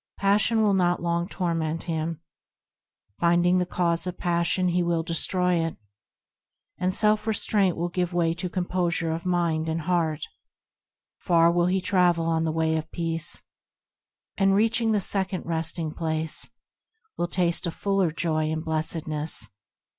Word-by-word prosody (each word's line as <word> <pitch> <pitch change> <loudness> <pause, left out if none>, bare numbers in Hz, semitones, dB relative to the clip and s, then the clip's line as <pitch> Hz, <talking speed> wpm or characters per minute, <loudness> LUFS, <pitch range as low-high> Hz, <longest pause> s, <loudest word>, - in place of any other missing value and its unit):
Passion 210 +3 +3
will 205 -2 +3
not 175 -2 +2
long 170 0 -1
torment 165 -4 -2
him; 165 -1 -3 1.0
Finding 175 +1 +3
the 180 - 0
cause 170 -1 0
of 180 - -4
passion, 175 +1 +1
he 175 +1 +1
will 170 -1 0
destroy 175 +1 0
it, 165 - -4 1.0
And 185 0 +1
self 215 +1 +2
restraint 205 -3 +1
will 170 +1 -1
give 180 0 -1
way 170 -2 +1
to 180 +2 -4
composure 175 -2 -1
of 165 +2 -4
mind 165 -3 0
and 160 +1 -1
heart, 160 -2 0 1.0
Far 170 -1 +4
will 175 0 +2
he 190 +1 +1
travel 180 -3 +2
on 165 0 +1
the 160 - 0
Way 160 0 +1
of 160 0 -5
Peace, 165 -1 -3 1.0
And, 195 0 +4
reaching 225 +2 +2
the 210 -2 +2
second 190 -1 -1
Resting 165 -1 -2
Place, 160 -1 -2 0.7
Will 175 - -1
taste 175 0 +1
of 165 - -4
fuller 195 -3 +1
joy 155 -1 -1
and 155 0 -3
blessedness. 155 -6 -1
170 Hz, 145 wpm, -26 LUFS, 165-185 Hz, 1.0 s, Far